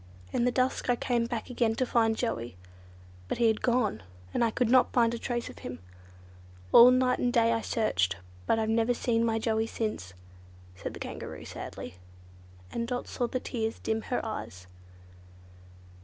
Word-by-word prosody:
In 240 - +2
the 250 - +3
dusk 255 0 0
I 245 - +4
came 240 -1 0
back 235 +1 -4
again 235 -2 +1
to 255 - +1
find 225 -2 +2
Joey, 120 - -3 0.7
but - - -2
he 235 - +2
had 220 -1 +2
gone, 240 - +1 0.3
and - - +2
I 230 - +3
could 240 +2 0
not 255 -1 +5
find 235 -2 +3
a 235 - -3
trace 240 0 -2
of - - -10
him. 125 - -6 0.9
All 240 +1 +10
night 255 0 +3
and - - +1
all 240 -1 +3
day 230 0 +3
I 225 - 0
searched, 95 - 0 0.3
but - - +3
I've 220 -1 0
never 230 +2 +2
seen 230 -1 +1
my 225 -1 +1
Joey 220 0 0
since," 155 - -4 0.6
said - - -6
the - - -9
Kangaroo - - -7
sadly, 90 - -8 0.7
and 235 0 -2
Dot 245 0 -3
saw 245 - -2
the 255 - -2
tears 225 -3 -3
dim 220 0 -2
her 245 - -2
eyes. 95 - -6
230 Hz, 185 wpm, -29 LUFS, 220-245 Hz, 0.9 s, All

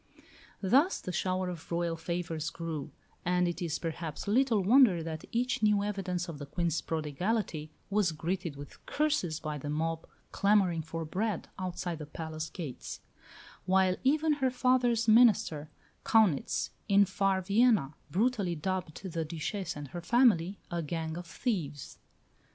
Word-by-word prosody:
Thus 275 - +4
the 185 - -5
shower 185 +1 -1
of 175 -2 -7
Royal 170 0 0
favours 165 -1 -3
grew; 165 -4 -5 0.3
and 180 0 +2
it 175 - -3
is 165 -2 -1
perhaps 165 -1 -5
little 225 -1 +3
wonder 210 -5 +5
that 160 -1 -5
each 250 +3 0
new 210 -1 +3
evidence 190 -3 -2
of 160 -4 -7
the 145 - -7
Queen's 170 +1 -1
prodigality 160 +1 -2 0.2
was 200 -4 +3
greeted 165 0 -3
with 145 0 -11
curses 290 - 0
by 150 -1 -4
the 145 - -5
mob 160 +2 -2 0.2
clamouring 195 -5 +3
for 165 +1 -5
bread 195 +4 -2
outside 180 -2 -3
the 150 - -7
palace 160 0 -5
gates; 155 -7 -7 0.7
while 190 0 +4
even 305 +3 +3
her 260 - +4
father's 250 -2 +2
minister, 215 -10 +4 0.3
Kaunitz, 210 -11 +2 0.2
in 200 0 +6
far 195 0 +1
Vienna, 205 - +3 0.2
brutally 200 - +1
dubbed 180 +1 -3
the 170 -3 -3
Duchesse 165 +4 -4
and 145 -2 -7
her 175 - -6
family, 205 -5 +3
"a 170 -1 -1
gang 160 0 -3
of 175 0 -7
thieves." 165 - -3
180 Hz, 145 wpm, -31 LUFS, 160-210 Hz, 0.7 s, in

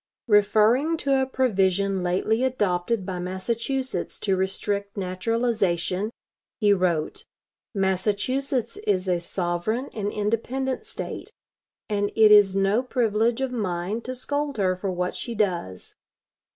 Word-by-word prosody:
Referring 220 +9 +4
to 275 -3 +2
a 265 - 0
provision 195 -7 +1
lately 190 +7 +1
adopted 205 -4 0
by 185 -2 -4
Massachusetts 230 +9 -2
to 195 -2 0
restrict 200 +2 -2
naturalization, 195 -1 0 0.5
he 205 -3 +5
wrote: 175 -5 0 0.5
"Massachusetts 215 +6 0
is 190 -2 0
a 180 -1 +2
sovereign 175 +8 -2
and 205 -2 -2
independent 235 +6 -2
State; - - -6 0.6
and 205 -1 0
it 220 -1 +6
is 205 -2 +7
no 195 +4 +2
privilege 235 -1 +1
of 265 -1 -1
mine 200 -1 -2
to 255 +2 -5
scold 285 +2 -2
her 185 -2 +2
for 190 +1 -3
what 180 0 -2
she 235 - -5
does. 175 - -2
205 Hz, 125 wpm, -25 LUFS, 185-235 Hz, 0.6 s, is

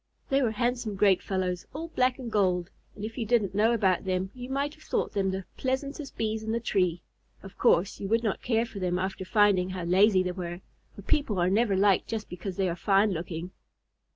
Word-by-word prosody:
They 275 +1 +3
were 245 - +2
handsome 235 -1 -1
great 195 -2 +4
fellows, 185 -2 -2
all 330 +2 -5
black 255 -4 +1
and 245 -4 -6
gold, 185 -4 +1 0.2
and 210 - -5
if 225 +3 -6
you 230 - -1
didn't 215 -5 +2
know 215 +3 +3
about 195 -6 +2
them, 190 0 -1
you 250 0 -8
might 280 +2 -1
have 310 - -19
thought - - -1
them 195 -2 +1
the 190 0 -3
pleasantest 275 +2 -3
Bees 220 0 -1
in 220 0 -3
the 230 - 0
tree. 180 -6 0 0.4
Of 195 - -11
course 185 +3 +3
you 195 - -4
would 225 +3 +2
not 215 -4 -1
care 230 -1 +1
for 225 -4 -8
them 180 -1 0
after 190 +1 -3
finding 195 -2 +3
how 185 -1 -4
lazy 185 +2 +4
they 180 - -2
were, 175 -1 -6 0.3
for 200 - -10
people 240 -4 +1
are 180 +1 +2
never 210 0 +2
liked 195 0 +3
just 220 -2 -4
because 180 +1 -6
they 190 -1 +1
are 170 - -1
fine 200 +3 +3
looking. 170 0 -5
200 Hz, 220 wpm, -28 LUFS, 185-230 Hz, 0.4 s, great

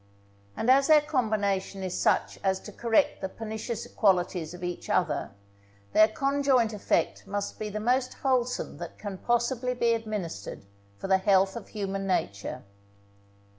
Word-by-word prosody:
And 245 - +3
as 275 +1 +5
their 310 -1 +7
combination 205 -9 -1
is 185 -1 -3
such - - +1
as 190 -1 +1
to 210 - -9
correct 230 +6 +1
the 190 - -2
pernicious 220 +2 -5
qualities 180 -5 +1
of 180 0 -10
each 175 0 -5
other, 160 -6 +1 0.6
their 215 - +7
conjoint 270 -1 +1
effect 210 - 0
must 205 0 -4
be 215 - -3
the 210 +1 -4
most 250 +3 +1
wholesome 250 -2 -1
that - - -7
can 200 -3 -6
possibly 240 +1 0
be 235 -1 +2
administered 205 - -5 0.3
for - - -5
the 190 0 +4
health 190 0 +3
of 235 - -7
human 195 -2 -3
nature. 100 - -2
215 Hz, 150 wpm, -28 LUFS, 190-240 Hz, 0.6 s, their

